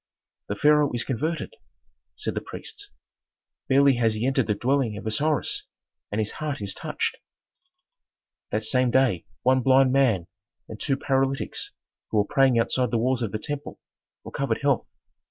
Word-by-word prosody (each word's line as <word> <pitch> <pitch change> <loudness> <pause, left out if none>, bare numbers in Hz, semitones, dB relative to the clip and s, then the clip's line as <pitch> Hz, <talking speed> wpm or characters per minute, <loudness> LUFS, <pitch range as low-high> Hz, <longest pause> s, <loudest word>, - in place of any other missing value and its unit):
The 100 - -2
pharaoh 150 +5 +4
is 120 - 0
converted!" 155 - -2 0.6
said - - -2
the - - -3
priests. 410 -2 -8 0.8
"Barely 135 -1 +5
has 115 -2 +2
he 110 +3 -2
entered 135 -3 +1
the 105 - +1
dwelling 125 -2 0
of - - -8
Osiris, 145 +8 0 0.4
and 105 - -2
his 110 -1 -1
heart 150 -2 -4
is 100 -2 -3
touched." - - -3 1.3
That 110 - -1
same 125 +3 +2
day 125 -9 +2 0.2
one 130 +1 +4
blind 130 +1 +5
man 125 -10 +3 0.4
and 110 - -9
two 135 -3 0
paralytics, 135 -1 -1 0.4
who 110 - -1
were 105 - +3
praying 135 -2 +3
outside 125 +2 +1
the 120 - 0
walls 125 +2 +1
of 110 -4 -2
the 110 - -2
temple, 145 +5 -6 0.5
recovered - - -2
health. - - +2
130 Hz, 155 wpm, -25 LUFS, 110-140 Hz, 1.3 s, Barely